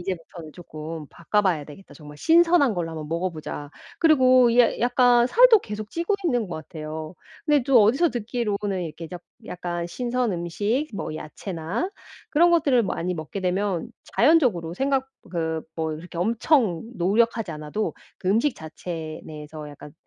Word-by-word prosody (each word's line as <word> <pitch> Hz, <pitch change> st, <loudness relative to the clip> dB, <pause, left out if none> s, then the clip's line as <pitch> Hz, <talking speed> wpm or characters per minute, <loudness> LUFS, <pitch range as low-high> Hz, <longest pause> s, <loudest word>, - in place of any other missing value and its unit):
'이제부터는 170 Hz, -3 st, -6 dB
쪼끔 155 Hz, -2 st, -8 dB
바꿔봐야 175 Hz, -3 st, 0 dB
되겠다. 155 Hz, +7 st, -13 dB
정말 150 Hz, -2 st, -12 dB
신선한 330 Hz, -, +4 dB
걸로 170 Hz, -2 st, -2 dB
한번 155 Hz, -2 st, -6 dB
먹어보자.' 165 Hz, -4 st, -4 dB, 0.3 s
그리고 255 Hz, -6 st, +5 dB
이 240 Hz, +1 st, +5 dB
야 240 Hz, -, +3 dB
약간 245 Hz, 0 st, +4 dB
살도 475 Hz, -, +7 dB
계속 210 Hz, -, -7 dB
찌고 340 Hz, +5 st, -1 dB
있는 245 Hz, -, +1 dB
것 175 Hz, -, -6 dB
같아요. 155 Hz, +1 st, -7 dB, 0.3 s
근데 295 Hz, -4 st, +3 dB
또 260 Hz, -5 st, +6 dB
어디서 270 Hz, +11 st, +3 dB
듣기로는 210 Hz, -5 st, -2 dB
이렇게 165 Hz, +1 st, -7 dB
약 180 Hz, -1 st, -8 dB, 0.2 s
약간 175 Hz, -1 st, -4 dB
신선 245 Hz, +3 st, -1 dB
음식 205 Hz, -, -1 dB
뭐 175 Hz, -, -4 dB
야채나 175 Hz, -, -4 dB, 0.4 s
그런 345 Hz, +3 st, +5 dB
것들을 280 Hz, -7 st, +4 dB
많이 180 Hz, -1 st, -2 dB
먹게 160 Hz, +5 st, -6 dB
되면 185 Hz, -1 st, -1 dB, 0.3 s
자연적으로 240 Hz, -, +3 dB
생각 270 Hz, +2 st, 0 dB, 0.2 s
그 160 Hz, -2 st, -2 dB
뭐 160 Hz, -1 st, -2 dB
이렇게 170 Hz, +3 st, -9 dB
엄청 220 Hz, -, +2 dB
노력하지 225 Hz, +3 st, +1 dB
않아도 155 Hz, +7 st, -3 dB, 0.3 s
그 185 Hz, -, -3 dB
음식 230 Hz, +8 st, +2 dB
자체 160 Hz, 0 st, -7 dB
내에서 150 Hz, 0 st, -9 dB
약간 145 Hz, 0 st, -12 dB
190 Hz, 335 characters per minute, -24 LUFS, 160-245 Hz, 0.4 s, 살도